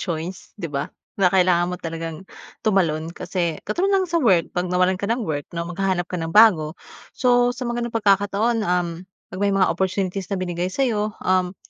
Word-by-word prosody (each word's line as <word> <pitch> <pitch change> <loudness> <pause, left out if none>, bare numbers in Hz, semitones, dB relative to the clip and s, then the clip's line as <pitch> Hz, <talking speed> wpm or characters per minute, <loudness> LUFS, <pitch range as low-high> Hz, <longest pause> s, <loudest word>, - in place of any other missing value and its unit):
choice, 170 +1 -5
di 170 - -3
ba? 140 0 -2 0.3
Na 190 -2 +3
kailangan 180 -1 +3
mo 180 - -6
talagang 165 +2 -6 0.3
tumalon. 165 -7 +1
Kasi 170 -2 -3
katulad 380 +3 0
lang 390 -1 +3
sa 335 -1 0
work, 190 -10 +3
'pag 180 0 -1
nawalan 180 +1 +1
ka 200 - -2
ng 230 0 0
work 145 -4 -3
'no, 170 - -2
maghahanap 180 0 -1
ka 180 - -2
ng 165 - -3
bago. 180 -8 +6 0.4
So, 245 -1 +3
sa 255 - -5
mga 240 0 -2
gano'ng 235 -1 -3
pagkakataon 205 +2 +2
uhm, 180 -3 0 0.4
'pag 185 - -6
may 200 -1 +2
mga 185 - +3
opportunities 190 +1 -2
na 200 - -2
binigay 180 -1 -2
sa'yo 215 -2 -1
uhm, 185 0 +1
185 Hz, 190 wpm, -22 LUFS, 175-215 Hz, 0.4 s, bago